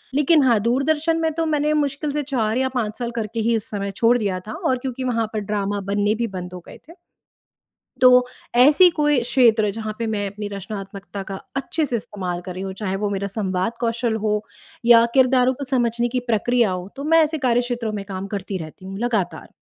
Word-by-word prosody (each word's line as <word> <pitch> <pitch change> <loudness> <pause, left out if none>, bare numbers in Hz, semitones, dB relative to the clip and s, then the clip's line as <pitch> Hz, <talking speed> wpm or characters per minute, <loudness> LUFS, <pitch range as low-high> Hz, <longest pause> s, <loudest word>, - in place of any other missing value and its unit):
लेकिन 295 +1 +4
हाँ, 240 -4 +4
दूरदर्शन 295 +7 +1
में 320 0 +1
तो 325 +1 -1
मैंने 300 -1 +1
मुश्किल 290 0 -1
से 295 0 -1
4 240 -5 -1
या 260 0 +1
5 215 -4 -2
साल 240 -1 -3
करके 225 0 -3
ही 230 +1 +2
उस 220 +3 -5
समय 200 -1 -3
छोड़ 230 +5 +3
दिया 200 -5 -1
था 215 - -5
और 260 -5 +2
क्योंकि 260 0 -5
वहाँ 230 -3 0
पर 215 - -1
ड्रामा 205 0 -2
बनने 205 +1 +1
भी 235 +1 -1
बंद 180 0 -7
हो 180 - -6
गए - - -11
थे। - - -11 1.1
तो 255 - +8 0.5
ऐसी 295 +9 +7
कोई 295 -3 +3
क्षेत्र 230 -4 +3
जहाँ 215 -1 -4
पे 230 - -2
मैं 205 -1 -1
अपनी 205 +1 -6
रचनात्मकता 200 0 -7
का 195 - -5 0.2
अच्छे 305 +3 -1
से 245 - -1
इस्तेमाल 185 -5 -4
कर 180 0 -8
रही 185 - -5
हूँ, 195 - -4
चाहे 195 -1 -3
वो 205 - 0
मेरा 200 0 -2
संवाद 190 0 -2
कौशल 230 -1 0
हो 210 0 +1 0.4
या 235 -1 +8
किरदारों 260 -1 +4
को 280 - -6
समझने 240 -2 0
की 250 +1 -1
प्रक्रिया 235 0 +2
हो, 180 0 -4
तो 280 - -6
मैं 325 +1 +5
ऐसे 315 +1 -3
कार्यक्षेत्रों 240 -2 0
में 205 -2 -4
काम 190 0 -5
करती 195 -1 -4
रहती 160 +3 -10
हूँ 195 0 -6
लगातार। 205 -8 -2
230 Hz, 210 wpm, -22 LUFS, 200-260 Hz, 1.1 s, तो